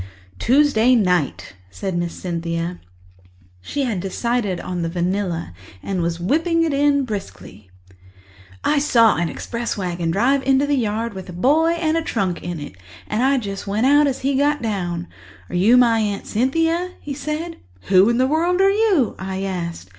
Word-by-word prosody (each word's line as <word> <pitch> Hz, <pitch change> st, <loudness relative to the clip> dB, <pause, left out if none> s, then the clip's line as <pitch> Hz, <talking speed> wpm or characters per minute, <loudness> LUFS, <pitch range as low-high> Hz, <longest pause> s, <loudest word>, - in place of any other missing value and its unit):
"Tuesday 255 Hz, -2 st, +4 dB
night," 180 Hz, -, 0 dB, 0.2 s
said 95 Hz, -, -4 dB
Miss 175 Hz, -1 st, -2 dB
Cynthia. 170 Hz, 0 st, -4 dB, 0.8 s
She 280 Hz, -, -3 dB
had 230 Hz, -8 st, -1 dB
decided 200 Hz, 0 st, -1 dB
on 180 Hz, -1 st, -4 dB
the 165 Hz, -, -1 dB
vanilla 175 Hz, -, -2 dB, 0.3 s
and 190 Hz, -2 st, -2 dB
was 170 Hz, 0 st, -2 dB
whipping 330 Hz, -, +1 dB
it 285 Hz, -2 st, +2 dB
briskly 100 Hz, -, -8 dB, 0.2 s
in. -, -, -22 dB, 0.7 s
"I 300 Hz, -, +2 dB
saw 230 Hz, -, +4 dB
an 170 Hz, 0 st, 0 dB
express 235 Hz, -1 st, -4 dB
wagon 175 Hz, -3 st, -2 dB
drive 250 Hz, +10 st, +2 dB
into 270 Hz, +1 st, +2 dB
the 290 Hz, -, 0 dB
yard 225 Hz, -3 st, -1 dB
with 190 Hz, -1 st, -8 dB
a -, -, -7 dB
boy 300 Hz, -, +3 dB
and 325 Hz, -2 st, 0 dB
a -, -, +1 dB
trunk 195 Hz, -, -2 dB
in 175 Hz, -2 st, -5 dB
it 145 Hz, -10 st, -9 dB, 0.3 s
and 215 Hz, +2 st, -2 dB
I 270 Hz, +2 st, +3 dB, 0.3 s
went 210 Hz, +4 st, 0 dB
out 290 Hz, +2 st, +5 dB
just 275 Hz, -3 st, 0 dB
as -, -, -14 dB
he 275 Hz, +1 st, 0 dB
got 290 Hz, +2 st, +2 dB
down. 180 Hz, -6 st, -3 dB, 0.4 s
'Are -, -, -5 dB
you 210 Hz, +8 st, +5 dB
my 235 Hz, -2 st, +4 dB
Aunt 205 Hz, -2 st, -2 dB
Cynthia?' 330 Hz, +9 st, 0 dB
he 290 Hz, -, -6 dB
said. 305 Hz, +4 st, -4 dB, 0.2 s
'Who 190 Hz, -, +4 dB
in 235 Hz, -, +1 dB
the 255 Hz, -, +3 dB
world 335 Hz, +6 st, +1 dB
are 390 Hz, 0 st, +5 dB
you?' 400 Hz, -, +2 dB
I 190 Hz, 0 st, -4 dB
asked. 170 Hz, -, -4 dB
225 Hz, 175 wpm, -21 LUFS, 175-280 Hz, 0.8 s, out